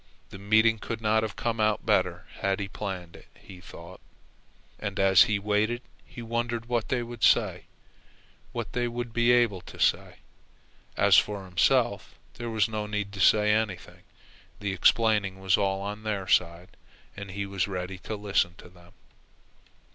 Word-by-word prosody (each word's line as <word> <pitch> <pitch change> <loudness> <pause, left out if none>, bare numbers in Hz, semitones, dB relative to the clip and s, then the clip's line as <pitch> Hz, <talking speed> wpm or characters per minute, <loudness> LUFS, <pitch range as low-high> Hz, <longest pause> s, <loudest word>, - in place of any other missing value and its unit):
The 95 - -9
meeting 110 +2 +3
could 115 0 -5
not 110 0 +2
have 110 -1 -4
come 115 -2 -2
about 110 -1 +1
better - - +1
had 100 0 0
it - - -2
been 100 -1 -5
planned, 90 -4 -6
he 90 -2 -14
thought. 85 +1 -12 0.8
And 100 -2 -4
as 95 -1 +6
he 110 - 0
waited 105 +4 0 0.2
he 120 - -10
wondered 120 0 -3
what 120 -2 -2
they 125 -2 0
would 120 -1 -9
say, - - +3 0.9
what 115 -4 -5
they 120 0 0
would 120 0 -5
be 120 +1 +3
able 120 -7 +2
to - - -13
say. - - +1 0.8
As - - +5
for 100 -2 -4
himself 90 -2 +1 0.2
there 120 0 -6
was 110 -3 +1
no 110 -1 -4
need 105 -1 -3
to 100 - -8
say 105 +3 +4
anything. 105 -4 -3 0.6
The 100 -2 -3
explaining 100 0 +2
was 95 -1 +2
all 95 -1 -1
on 105 +2 -5
their 105 -3 -3
side, 85 -1 0 0.4
and 100 -1 -8
he 100 +2 -4
was 100 -2 -2
ready 95 -1 -5
to 110 - -6
listen 100 -4 0
to - - -14
them. 85 -1 -20
105 Hz, 170 wpm, -27 LUFS, 95-115 Hz, 0.9 s, as